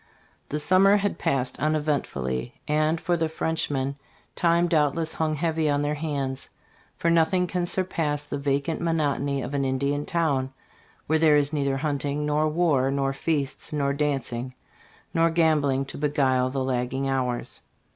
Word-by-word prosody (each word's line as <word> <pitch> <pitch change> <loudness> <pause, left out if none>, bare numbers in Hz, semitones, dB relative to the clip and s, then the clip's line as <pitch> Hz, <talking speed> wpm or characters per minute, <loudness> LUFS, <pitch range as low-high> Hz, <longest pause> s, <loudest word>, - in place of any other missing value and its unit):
The 150 - -2
summer 190 +6 +5
had 200 -4 -2
passed 130 -2 0
uneventfully, 140 - -1
and 155 +2 +1
"for 175 - 0
the 160 -1 0
Frenchmen 145 -4 -1 0.4
time 170 0 +3
doubtless 160 0 +1
hung 155 -1 -1
heavy 160 0 0
on 145 0 +1
their 145 +1 0
hands; 140 -4 -3 0.5
for 170 - +1
nothing 170 +2 +3
can 180 0 -2
surpass 160 -6 -1
the 145 -1 -4
va 140 0 +1
cant 160 +2 -4
monotony 145 -4 0
of 125 - -6
an 140 -1 0
Indian 140 +2 -1
town 140 -6 0 0.5
when 160 +1 +2
there 155 -2 +6
is 145 +1 +1
neither 140 -2 0
hunting, 145 0 -1
nor 150 +1 +1
war, 150 -5 +2
nor 135 0 0
feasts, 140 -1 -2
nor 140 -2 0
dancing, 130 -4 -2 0.6
nor 165 0 +3
gambling 150 -5 +2
to 135 - -8
beguile 135 -3 +2
the 135 0 -2
lagging 130 +1 -1
hours.'' 125 -2 -2
145 Hz, 155 wpm, -25 LUFS, 135-160 Hz, 0.6 s, there